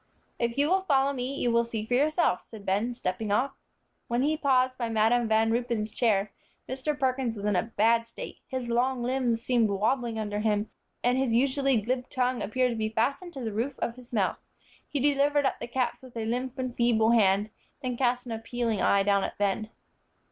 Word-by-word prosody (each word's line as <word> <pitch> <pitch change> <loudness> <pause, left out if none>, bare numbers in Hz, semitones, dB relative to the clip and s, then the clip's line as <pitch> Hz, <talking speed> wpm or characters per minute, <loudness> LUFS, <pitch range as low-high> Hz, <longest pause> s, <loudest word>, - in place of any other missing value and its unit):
"If 235 +1 -1
you 285 +1 +3
will 380 +3 +3
follow 280 -6 +2
me, 260 +1 -3
you 245 - 0
will 235 0 +3
see 225 -2 -4
for 245 - -3
yourself," 295 - +2
said 215 -3 -12
Ben, 205 +6 0
stepping 205 0 -3
off. 260 +7 +2 0.6
When 240 +2 0
he 305 +2 +2
paused 260 -4 +2
by 235 -2 -1
Madam 225 +2 +2
Van 220 0 +3
Ruypen's 235 -2 -1
chair, 210 -4 +1 0.4
Mr. 270 +3 -2
Perkins 255 -3 0
was 205 -1 -6
in 210 -2 +2
a 180 - +3 0.2
bad 230 +2 +3
state. 230 - -9
His 260 -2 -4
long 245 +1 +1
limbs 245 -2 0
seemed 235 -4 +2
wobbling 225 +4 0
under 210 -1 -2
him, 210 0 0 0.3
and 250 +1 +2
his 255 -4 +1
usually 270 0 +2
glib 250 +4 -2
tongue 250 -1 0
appeared 250 +4 +1
to - - -3
be 215 -1 -1
fastened 275 +11 -1
to 270 - -6
the 225 -3 -3
roof 245 +6 -2
of 235 - -2
his 250 -1 -15
mouth. 205 -6 0 0.5
He 285 - -1
delivered 285 +1 +2
up - - 0
the - - -5
caps 250 +1 -1
with 255 -2 -12
a 225 - -2
limp 250 +3 -2
and 255 -2 -3
feeble 230 -2 +3
hand, 205 -2 +3 0.3
then 250 -1 -2
cast 245 0 0
an 240 - -7
appealing 230 -1 -2
eye 200 0 +4
down 200 -1 +2
at - - -4
Ben. 205 +2 0
240 Hz, 205 wpm, -28 LUFS, 220-260 Hz, 0.6 s, eye